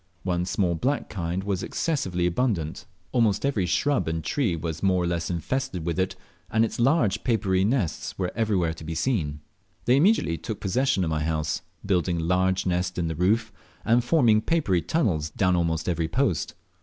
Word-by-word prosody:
One 90 Hz, -1 st, 0 dB
small 90 Hz, -2 st, +1 dB
black 130 Hz, -, -1 dB
kind 90 Hz, -1 st, -2 dB
was 100 Hz, -2 st, -1 dB
excessively 95 Hz, -, -1 dB
abundant. 90 Hz, -4 st, -1 dB, 0.2 s
Almost 115 Hz, -3 st, +2 dB
every 110 Hz, -10 st, +1 dB
shrub 140 Hz, -, +1 dB
and 80 Hz, 0 st, -2 dB
tree 110 Hz, -, 0 dB
was 80 Hz, 0 st, -4 dB
more 95 Hz, -2 st, +2 dB
or -, -, 0 dB
less 85 Hz, -1 st, -1 dB
infested 90 Hz, +1 st, -2 dB
with 85 Hz, +1 st, -1 dB
it, 95 Hz, 0 st, 0 dB, 0.3 s
and 110 Hz, +1 st, +3 dB
its 115 Hz, -, -6 dB
large 120 Hz, -, +2 dB
papery 100 Hz, -6 st, +1 dB
nests 105 Hz, -, -1 dB
were 90 Hz, -2 st, -1 dB
everywhere 100 Hz, -7 st, +1 dB
to 80 Hz, -, -11 dB
be 80 Hz, +1 st, -5 dB
seen. 80 Hz, -, -1 dB, 0.4 s
They 125 Hz, +2 st, +4 dB
immediately 150 Hz, -, +3 dB
took 110 Hz, -, -5 dB
possession 115 Hz, +1 st, +1 dB
of 80 Hz, -, -1 dB
my 80 Hz, -1 st, 0 dB
house, 75 Hz, -1 st, -1 dB, 0.2 s
building 90 Hz, -3 st, +1 dB
a -, -, -2 dB
large 95 Hz, +2 st, +1 dB
nest 90 Hz, 0 st, -1 dB
in 85 Hz, -2 st, 0 dB
the 80 Hz, -, -3 dB
roof, 110 Hz, +7 st, +1 dB, 0.3 s
and 120 Hz, +2 st, +4 dB
forming 120 Hz, -6 st, +4 dB
papery 110 Hz, -, +1 dB
tunnels 85 Hz, -, 0 dB
down 90 Hz, +3 st, +1 dB
almost 80 Hz, -2 st, 0 dB
every 85 Hz, -2 st, 0 dB
post. 105 Hz, -, 0 dB
95 Hz, 180 wpm, -26 LUFS, 85-115 Hz, 0.4 s, They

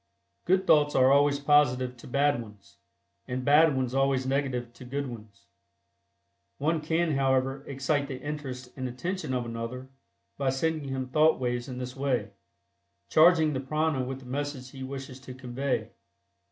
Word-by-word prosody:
Good 190 Hz, +1 st, +3 dB
thoughts 145 Hz, -3 st, +4 dB
are 130 Hz, 0 st, +5 dB
always 140 Hz, 0 st, +4 dB
positive 130 Hz, -4 st, +3 dB
to -, -, -12 dB
bad 140 Hz, 0 st, +2 dB
ones, 105 Hz, -3 st, -14 dB, 0.5 s
and 125 Hz, 0 st, -3 dB
bad 150 Hz, 0 st, +5 dB
ones 130 Hz, -1 st, -1 dB
always 135 Hz, -1 st, +2 dB
negative 130 Hz, -3 st, -1 dB
to 130 Hz, -, -12 dB
good 140 Hz, +3 st, -3 dB
ones. 110 Hz, -5 st, -10 dB, 1.1 s
One 155 Hz, +3 st, 0 dB
can, 160 Hz, +2 st, +1 dB
however, 135 Hz, -1 st, +1 dB
excite 140 Hz, +1 st, -1 dB
the 130 Hz, -2 st, -6 dB
interest 130 Hz, -4 st, -6 dB
and 130 Hz, -1 st, -3 dB
attention 175 Hz, +7 st, -4 dB
of 125 Hz, -2 st, -1 dB
another 115 Hz, +3 st, -6 dB, 0.5 s
by 135 Hz, -1 st, +1 dB
sending 150 Hz, +2 st, -1 dB
him 130 Hz, -1 st, -3 dB
thought 155 Hz, +3 st, +4 dB
waves 125 Hz, 0 st, -2 dB
in 125 Hz, -, -6 dB
this 125 Hz, 0 st, -5 dB
way, 135 Hz, -2 st, -1 dB, 0.8 s
charging 160 Hz, -1 st, +5 dB
the 130 Hz, -, -1 dB
prana 150 Hz, 0 st, 0 dB
with 135 Hz, +1 st, -5 dB
the -, -, -14 dB
message 135 Hz, 0 st, -4 dB
he 135 Hz, -, -10 dB
wishes 130 Hz, 0 st, -7 dB
to 130 Hz, -1 st, -10 dB
convey. 130 Hz, +1 st, -3 dB
135 Hz, 160 wpm, -28 LUFS, 125-145 Hz, 1.1 s, are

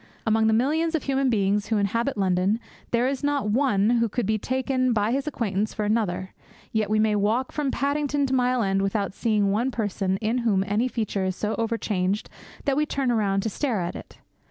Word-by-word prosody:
Among 220 Hz, 0 st, +3 dB
the 220 Hz, -, +3 dB
millions 315 Hz, +8 st, +1 dB
of 315 Hz, -, -1 dB
human 270 Hz, -1 st, +1 dB
beings 205 Hz, -2 st, +1 dB
who 220 Hz, -, +1 dB
inhabit 230 Hz, +6 st, 0 dB
London, 190 Hz, +2 st, +1 dB, 0.3 s
there 240 Hz, +1 st, +2 dB
is 275 Hz, +1 st, -2 dB
not 285 Hz, -7 st, 0 dB
one 225 Hz, -4 st, +2 dB
who 235 Hz, -1 st, +2 dB
could 240 Hz, +2 st, -1 dB
be 215 Hz, +1 st, 0 dB
taken 255 Hz, +1 st, 0 dB
by 210 Hz, 0 st, +1 dB
his 275 Hz, +3 st, -1 dB
acquaintance 215 Hz, -7 st, -2 dB
for 210 Hz, -, -1 dB
another; 190 Hz, -4 st, -1 dB, 0.4 s
yet 220 Hz, -2 st, 0 dB
we 215 Hz, -, +2 dB
may 215 Hz, 0 st, +3 dB
walk 220 Hz, +6 st, +1 dB
from 295 Hz, -2 st, -1 dB
Paddington 285 Hz, +1 st, 0 dB
to 265 Hz, -, -2 dB
Mile 250 Hz, -1 st, +2 dB
End 195 Hz, 0 st, +1 dB
without 195 Hz, -1 st, -1 dB
seeing 210 Hz, -3 st, +1 dB
one 230 Hz, +6 st, +1 dB
person 200 Hz, -5 st, -1 dB
in 225 Hz, +4 st, 0 dB
whom 210 Hz, -5 st, +2 dB
any 210 Hz, +5 st, +1 dB
feature 215 Hz, -5 st, -2 dB
is 185 Hz, -1 st, -1 dB
so 210 Hz, +3 st, -2 dB
overcharged 210 Hz, -4 st, -1 dB, 0.3 s
that 275 Hz, -, +2 dB
we 300 Hz, +1 st, +1 dB
turn 270 Hz, -4 st, 0 dB
round 195 Hz, -3 st, +1 dB
to 220 Hz, -, -1 dB
stare 245 Hz, -2 st, -1 dB
at 175 Hz, 0 st, -3 dB
it. -, -, -10 dB
220 Hz, 205 wpm, -25 LUFS, 205-255 Hz, 0.4 s, Among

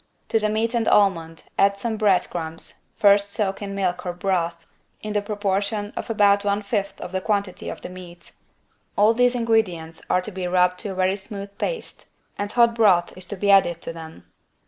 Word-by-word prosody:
To 225 Hz, -, +2 dB
the 215 Hz, 0 st, 0 dB
meat 220 Hz, +2 st, 0 dB
and 230 Hz, -2 st, 0 dB
almond 165 Hz, -5 st, +2 dB, 0.2 s
add 200 Hz, 0 st, +4 dB
some 220 Hz, +2 st, -2 dB
bread 210 Hz, -4 st, +2 dB
crumbs, 165 Hz, -1 st, -5 dB
first 200 Hz, 0 st, +4 dB
soaked 200 Hz, -3 st, -1 dB
in 200 Hz, -1 st, -5 dB
milk 185 Hz, -3 st, -1 dB
or 180 Hz, -, -3 dB
broth, 175 Hz, -2 st, -2 dB, 0.4 s
in 215 Hz, 0 st, -4 dB
the 205 Hz, -, +1 dB
proportion 205 Hz, 0 st, -2 dB
of -, -, -5 dB
about 205 Hz, -2 st, +4 dB
one 205 Hz, +1 st, 0 dB
fifth 200 Hz, -1 st, -2 dB
of 180 Hz, -, -7 dB
the 190 Hz, 0 st, -2 dB
quantity 200 Hz, -2 st, -2 dB
of -, -, -7 dB
the -, -, -7 dB
meat. 180 Hz, -1 st, -12 dB, 0.7 s
All 210 Hz, +2 st, +5 dB
these 245 Hz, +1 st, +3 dB
ingredients 200 Hz, -9 st, 0 dB
are 180 Hz, -, +3 dB
to 215 Hz, -, -6 dB
be 185 Hz, -2 st, -4 dB
rubbed 180 Hz, 0 st, +2 dB
to 210 Hz, -, -4 dB
a 190 Hz, -, -5 dB
very 185 Hz, +1 st, +1 dB
smooth 200 Hz, 0 st, -8 dB
paste -, -, -4 dB, 0.3 s
and 205 Hz, 0 st, -3 dB
hot 235 Hz, -1 st, +4 dB
broth 195 Hz, -7 st, +3 dB
is 185 Hz, -, -9 dB
to 205 Hz, -, -4 dB
be 200 Hz, +1 st, +2 dB
added 175 Hz, -4 st, +4 dB
to -, -, -5 dB
them. 160 Hz, -1 st, -11 dB
200 Hz, 200 wpm, -23 LUFS, 180-210 Hz, 0.7 s, All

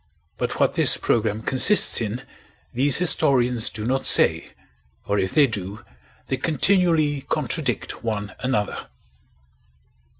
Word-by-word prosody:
But -, -, -4 dB
what -, -, +2 dB
this -, -, +4 dB
program 110 Hz, -1 st, -1 dB
consists 130 Hz, -, +3 dB
in 115 Hz, +3 st, -4 dB, 0.5 s
these 135 Hz, +3 st, +1 dB
historians 130 Hz, -9 st, +2 dB
do 105 Hz, -1 st, -7 dB
not 135 Hz, +2 st, -1 dB
say, -, -, +2 dB, 0.6 s
or 100 Hz, 0 st, -1 dB
if 95 Hz, -, -2 dB
they 150 Hz, -, +5 dB
do 105 Hz, -4 st, -6 dB, 0.4 s
they 130 Hz, -, -3 dB
continually 160 Hz, -1 st, +1 dB
contradict 140 Hz, -3 st, -3 dB
one 105 Hz, -2 st, -4 dB
another. 125 Hz, -5 st, -3 dB
125 Hz, 120 wpm, -22 LUFS, 110-145 Hz, 0.6 s, they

